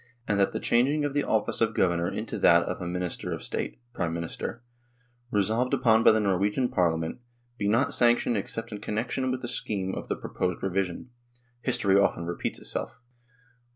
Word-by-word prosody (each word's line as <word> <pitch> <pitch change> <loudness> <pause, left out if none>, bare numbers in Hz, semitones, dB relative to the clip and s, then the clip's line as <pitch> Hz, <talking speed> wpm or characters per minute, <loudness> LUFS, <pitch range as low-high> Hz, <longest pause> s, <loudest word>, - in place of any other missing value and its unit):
and 100 -1 +1
that 100 - +3
the - - -3
changing 140 +5 +2
of 145 - -2
the 145 0 +1
office 110 +1 +1
of 115 -1 +2
governor 85 -2 +2
into - - -4
that 85 +1 +6
of - - -4
a 90 - -3
Minister 90 0 -3
of - - -4
State - - -3 0.2
(Prime 85 -7 -1
Minister), 85 +7 -5 0.7
resolved 110 +4 +1
upon 110 -1 +4
by - - +8
the 110 - +3
Norwegian 105 +5 +1
Parliament, 80 -1 0 0.4
be 100 - 0
not 120 +6 +2
sanctioned 120 -1 +3
except 115 +3 -4
in 105 - -6
connec 110 +3 -3
tion 130 -1 0
with 130 0 -3
the - - -2
scheme 95 -5 -2
of - - -5
the - - -1
proposed 90 0 -3
revision. 95 +4 -2 0.5
History 100 -7 +3
often 85 -4 +1
repeats 85 +1 -3
itself. - - -5
105 Hz, 185 wpm, -27 LUFS, 90-120 Hz, 0.7 s, by